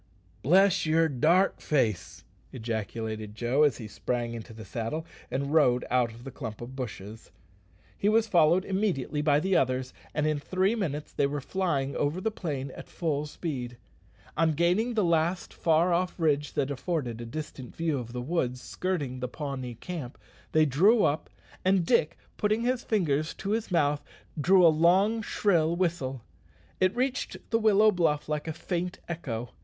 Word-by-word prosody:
"Bless 185 +3 +4
yer 160 +1 +4
dark 160 +7 +2
face!" 110 - -1 0.3
ejaculated 110 -2 -4
Joe, 120 +6 +1
as 145 -6 +4
he 110 - -7
sprang 120 +2 -3
into 115 0 -8
the 110 -1 -10
saddle 115 - -4 0.2
and 140 +2 -2
rode 125 -6 +4
out 125 -1 +3
of 115 +2 -13
the 135 - -7
clump 115 -6 -7
of 120 +2 -8
bushes. 110 -4 -7 0.7
He 205 - +1
was 220 +1 +4
followed 175 -2 +4
immediately 190 - -1
by 145 -1 +3
the 190 +4 +1
others, 130 0 +1 0.2
and 150 0 +1
in 155 -1 +1
three 185 +7 +1
minutes 150 -10 -3
they 140 - +2
were 145 +1 -3
flying 140 -4 -1
over 145 +5 0
the 220 +4 -1
plain 140 -9 -4
at - - -11
full 150 -3 -2
speed. 130 -7 -5 0.6
On 160 0 +2
gaining 180 +10 +1
the 215 - +2
last 170 +1 +1
far 165 +2 +2
off 180 +1 -1
ridge, 150 -3 +1
that 140 0 0
afforded 135 -5 -3
a - - -6
distant 140 -2 -7
view 160 -4 0
of 120 -1 -7
the 125 0 -4
woods 125 -4 -1
skirting 140 -1 -3
the 125 - -2
Pawnee 130 -3 -5
camp, 145 -1 -7 0.3
they 155 0 +4
drew 195 - +4
up; 145 +2 0 0.3
and 185 -2 +3
Dick, 155 - +2 0.2
putting 215 +2 +1
his 250 0 0
fingers 155 -8 0
to 195 - -4
his 225 0 -1
mouth, 145 -5 +1 0.4
drew 180 +4 +5
a - - +9
long, 185 +8 +3
shrill 170 -6 +1
whistle. 150 -9 -1 0.6
It 185 +2 +2
reached 260 +2 -1
the 225 - +3
willow 215 -1 +5
bluff 165 -5 +1
like 150 +1 -2
a - - -1
faint 175 +2 -3
echo. 125 -8 -4
155 Hz, 170 wpm, -28 LUFS, 130-180 Hz, 0.7 s, a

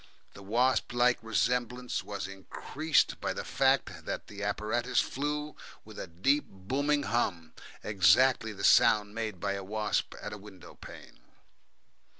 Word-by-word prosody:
The 100 - -12
wasp 120 +6 +1
like 120 0 +3
resemblance 125 +2 -1
was 100 -2 -5
increased 135 - -1
by - - -1
the - - -5
fact - - +1
that - - -4
the 105 -1 -10
apparatus 110 +5 0
flew 150 +2 -2 0.3
with - - -11
a - - -5
deep 115 - +1
booming 140 +10 -1
hum, 85 - -1 0.3
exactly 110 +5 +4
the 100 -2 -8
sound 105 0 +5
made 110 -4 -4
by 100 +1 -1
a 100 -1 -5
wasp 105 +2 -2
at - - -6
a 105 - -8
windowpane. 100 -2 -13
110 Hz, 140 wpm, -30 LUFS, 100-125 Hz, 0.3 s, sound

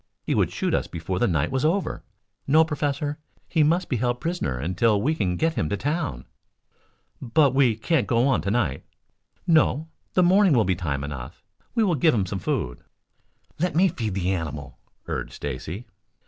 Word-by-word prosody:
He - - -1
would - - +2
shoot - - -1
us - - 0
before 85 +2 -4
the - - +3
night 75 -5 0
was 130 -1 0
over. 175 +5 0 0.5
No, 155 +3 +5
Professor, 145 -1 -2 0.3
he 160 - +1
must 170 +5 +2
be 125 - -1
held 120 +1 0
prisoner 165 - -2
until 95 - +1
we 145 +9 +1
can 95 - -1
get 165 0 +1
him 80 - -1
to 100 - -1
town." 145 - -2 1.0
"But 135 +2 +3
we 130 -5 +4
can't 130 +5 0
go 120 +2 +3
on 135 -5 +2
to 100 - -2
night." 100 - 0 0.6
"No. 160 -2 +3 0.3
The 185 - +5
morning 190 0 +5
will 115 -4 +4
be 95 - +2
time 70 -5 -3
enough. 70 -4 -7 0.3
We 230 - +3
will 190 -4 +2
give 155 0 +3
him 100 -4 +1
some 95 +1 -4
food." 60 -7 -2 0.8
"Let 180 +1 0
me 185 +3 +5
feed 110 - -3
the 95 -1 0
animal," 80 -5 -4 0.3
urged - - -4
Stacy. 75 - -5
120 Hz, 185 wpm, -25 LUFS, -, 1.0 s, No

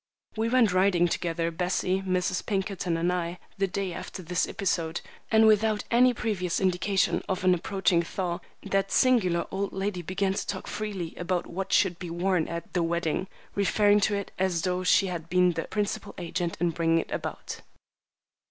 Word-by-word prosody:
We 225 +1 0
went 235 -6 +4
riding 185 -2 +4
together, 170 0 -1
Bessie, 185 +2 0
Mrs. 185 -1 0
Pinkerton, 190 -4 -1
and 175 +2 +1
I, 175 0 -2 0.2
the 195 - +2
day 190 -1 -3
after 185 +2 -7
this 180 +2 0
episode; 175 -5 -1 0.3
and 220 0 +5
without 215 0 +3
any 250 +2 +6
previous 205 -7 -1
indication 190 +1 +1
of 185 -1 -1
an 185 0 +5
approaching 180 -1 +1
thaw, 175 0 -3 0.2
that 195 0 0
singular 190 -10 +3
old 195 +1 -2
lady 195 -1 -2
began 190 +3 -1
to - - -3
talk 190 - -4
freely 195 -6 -4
about 175 0 -1
what 195 +2 -5
should 180 -3 +3
be 180 - -6
worn 175 0 0
at 170 0 -6
"the 180 - +1
wedding," 170 +1 -1 0.3
referring 205 +1 +3
to 205 0 +1
it 200 -1 -4
as 180 -3 +1
though 180 0 0
she 195 - +4
had 170 -3 -5
been 180 0 +4
the 165 -1 -3
principal 205 -1 -3
agent 175 -1 -3
in 170 0 +2
bringing 165 0 +2
it 165 - -2
about. - - -5
185 Hz, 175 wpm, -27 LUFS, 175-200 Hz, 0.3 s, any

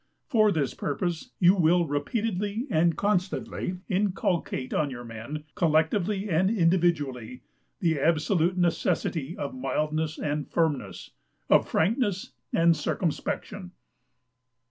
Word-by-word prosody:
For 215 -4 +3
this 145 -8 0
purpose 165 +3 -3
you 180 +1 +6
will 175 -1 +3
repeatedly 205 - -2
and 165 -1 +2
constantly 185 -2 -1
inculcate 185 -8 -1
on 150 - +1
your 120 -2 -7
men, 120 +6 -7
collectively 180 +4 +1
and 185 +1 +2
individually, 165 - 0 0.4
the 165 -5 +1
absolute 165 +3 +2
necessity 170 -2 0
of - - -4
mildness 155 -10 -2
and 150 -1 -3
firmness, 160 -5 -1 0.4
of - - +5
frankness 200 - 0 0.2
and 165 0 +4
circumspection. 180 +4 -3
170 Hz, 105 wpm, -27 LUFS, 155-190 Hz, 0.4 s, you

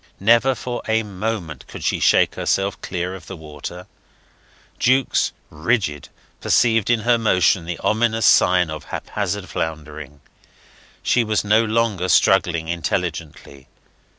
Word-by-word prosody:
Never 115 +6 +4
for 125 -1 -5
a 110 0 +1
moment 100 -5 -5
could - - -9
she - - 0
shake - - +3
herself 95 0 -1
clear 90 0 -4
of 90 -4 -11
the 95 - -8
water; 80 +3 -9 0.9
Jukes, 130 +1 +2 0.2
rigid, 80 - -1 0.3
perceived 115 -3 +2
in 120 -2 +2
her 120 +1 +2
motion 90 -5 +2
the 85 0 -4
ominous 110 0 0
sign 90 -3 +4
of 80 - -7
haphazard 100 -1 -4
floundering. 75 -3 -6 0.8
She 120 - +2
was 110 -1 0
no 105 +2 +3
longer 110 -5 0
struggling 85 -4 +3
intelligently. 80 -5 -4
95 Hz, 125 wpm, -21 LUFS, 85-110 Hz, 0.9 s, Never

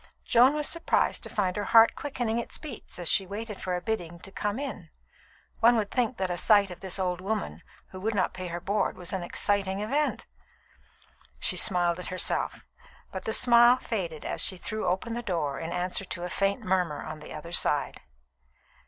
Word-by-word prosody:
Joan 250 +4 +5
was 300 -1 0
surprised 335 - +1
to - - -7
find 185 -3 -1
her 205 - -2
heart 225 +2 +6
quickening 240 -5 -2
its 235 - -5
beats 285 -8 -9
as 175 -2 -4
she 190 - +3
waited 210 +1 -6
for 180 -1 -1
a 180 - -3
bidding 175 -5 -3
to 195 - -12
"Come 205 +2 -2
in!" 265 - -6 0.7
One 235 +1 +5
would 210 -2 -1
think 245 -1 0
that 190 -1 -1
a 175 - -2
sight 205 0 +4
of 180 - -9
this 190 -1 -4
old 180 -1 -1
woman 210 +2 -3 0.3
who 185 - -8
would 215 +3 -1
not 185 - +1
pay 185 -1 -5
her 175 0 -4
board 200 +4 -1
was 180 +1 -7
an 190 - -1
exciting 195 +2 0
event! 280 +8 -1 1.1
She - - +2
smiled 175 -3 +3
at 180 - -5
herself, 185 - 0 0.5
but 190 - -6
the - - -1
smile 240 +1 +6
faded 175 -11 -4
as - - -1
she 185 - 0
threw 215 +2 -3
open 190 +6 -1
the 240 - -3
door 160 -10 -2
in 165 0 -5
answer 180 +2 -1
to 175 -2 -6
a 180 - -3
faint 195 0 0
murmur 180 -5 0
on 155 - -7
the 150 - -11
other 160 +2 -8
side. 150 -4 +1
195 Hz, 200 wpm, -28 LUFS, 180-225 Hz, 1.1 s, heart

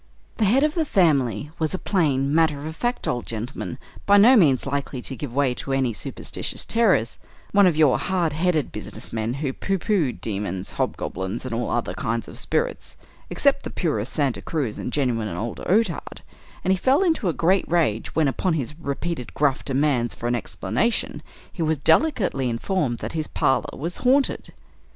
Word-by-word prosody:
The 220 - +2
head 250 +8 +4
of 305 0 +2
the 330 - +1
family 150 - +2
was 160 +2 0
a - - -2
plain, 145 -9 +1
matter 150 -3 +2
of 160 0 -5
fact 240 +7 -2
old 120 -1 -2
gentleman, 120 +3 -5 0.3
by 200 0 +7
no 235 +6 +8
means 145 - +4
likely 140 -1 -3
to 135 - -3
give 140 -1 -6
way 135 0 +1
to 135 +2 -4
any 130 -3 +1
superstitious - - -2
terrors 195 - +2 0.3
one 200 -1 +6
of 165 -4 +1
your 150 -4 +4
hard 175 -5 0
headed 160 -2 0
business - - -8
men 115 +2 -1
who 135 - -1
pooh 195 +7 -1
poohed 180 - 0
demons, 95 -3 -4
hobgoblins, 95 +7 -3
and 130 - -4
all 120 +1 -1
other 120 - -1
kinds 115 0 -2
of - - -6
spirits, 485 +1 -2 0.3
except 280 -1 +2
the - - -6
purest 135 - -2
Santa 140 -4 0
Cruz 140 -10 -3
and - - -4
genuine 120 -6 0
old 115 +4 -4
Otard; 195 -4 0 0.4
and 190 - +3
he - - 0
fell 265 - +3
into 320 - +1
a - - +3
great 185 +4 +1
rage, 155 -11 0
when 160 -2 +3
upon 170 +6 0
his 150 -2 -2
repeated 150 -2 -4
gruff 140 -2 +1
demands 135 -3 +1
for - - -8
an 120 - +1
explanation, 115 - -1 0.3
he 175 - -5
was 160 -1 +1
delicately 180 - +2
informed 120 +1 -1
that - - -6
his 155 -2 -2
parlor 130 - 0
was 170 +5 -4
"haunted." 265 +2 +1
150 Hz, 185 wpm, -23 LUFS, 125-185 Hz, 0.4 s, no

